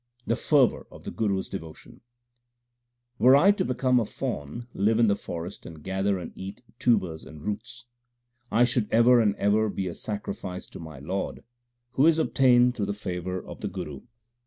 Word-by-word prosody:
The 115 - +1
fervour 140 -3 +2
of - - -14
the - - -6
Guru 100 -3 0
s 95 - -4
devotion: 80 -5 -9 1.2
Were 130 +3 +7
I 185 +8 +6
to 205 - 0
become 125 0 +2
a 115 - 0
fawn, 75 +5 -5
live 105 +3 +2
in 120 - +5
the 100 -2 +3
forest, 85 -2 -7
and 80 -2 -11
gather 95 +1 0
and 90 -3 -7
eat 95 +5 -8 0.2
tubers 95 -11 +1
and 80 -1 -11
roots, 120 +5 -5 0.7
I 120 - +4
should 120 -3 +1
ever 120 +1 +6
and 105 -3 +2
ever 105 +2 +2
be 95 -1 -3
a 85 - -4
sacrifice 100 -3 -5
to - - -10
my 80 -4 -9
Lord, 90 +9 -4 0.5
who 135 +4 +4
is 165 -1 +5
obtained 125 -5 +4
through 105 -5 -2
the 100 - -1
favour 90 -2 -4
of - - -10
the 105 - -2
Guru. 90 -8 -6
105 Hz, 185 wpm, -27 LUFS, 90-120 Hz, 1.2 s, Were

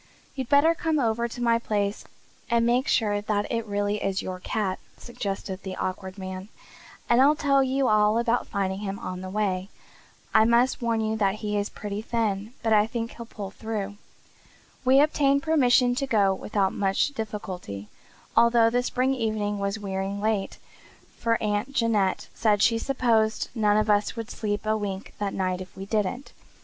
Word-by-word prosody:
"You'd 260 -3 -5
better 290 +4 +5
come 325 -2 -1
over 235 -1 +1
to 240 +1 -6
my 230 -1 +3
place 205 -3 -2 0.4
and 235 0 +3
make 245 +4 +2
sure 205 -6 +2
that 205 0 0
it 230 -2 -2
really 205 0 -1
is 195 -1 -1
your 185 -1 -5
cat," 190 0 -2 0.2
suggested 195 -4 -5
the 190 -1 -6
Awkward 185 +1 -4
Man, 190 +1 -6 0.6
"and 240 +2 +4
I'll 290 +3 +6
tell 275 -2 +3
you 265 0 +1
all 210 +1 +4
about 235 +1 +1
finding 195 -2 -2
him 200 -1 -4
on 185 -1 -6
the 185 - -6
way. 195 -2 -1 0.6
I - - +6
must 235 +4 +3
warn 230 -1 +1
you 220 0 0
that 200 -2 +1
he 210 0 -1
is 205 0 -1
pretty 205 0 -5
thin 220 -1 -2
but 225 -1 +2
I 210 0 +4
think 230 0 -4
he'll 235 -1 -9
pull 200 -4 -7
through." 205 -2 -4 0.9
We 260 +1 +5
obtained 280 -1 +3
permission 255 -6 +4
to 275 +2 -2
go 205 -6 +3
without 195 0 -1
much 195 +6 +1
difficulty, 190 - -6 0.5
although 235 -1 +5
the 245 +1 +2
spring 255 +1 0
evening 215 -4 -1
was 200 +1 -1
wearing 195 -1 -3
late, 210 -2 -1 0.6
for 230 -1 +2
Aunt 210 +5 -1
Janet 215 -7 +1
said 210 -3 +2
she 230 -1 +3
supposed 225 -4 +1
none 210 -3 +2
of 215 0 +2
us 205 0 +2
would 225 -2 -6
sleep 210 -1 -3
a 215 0 +2
wink 200 -2 -4
that 205 -1 -2
night 185 -1 -1
if 185 0 -11
we 195 - -6
didn't. 215 +5 -2
215 Hz, 180 wpm, -26 LUFS, 200-235 Hz, 0.9 s, I'll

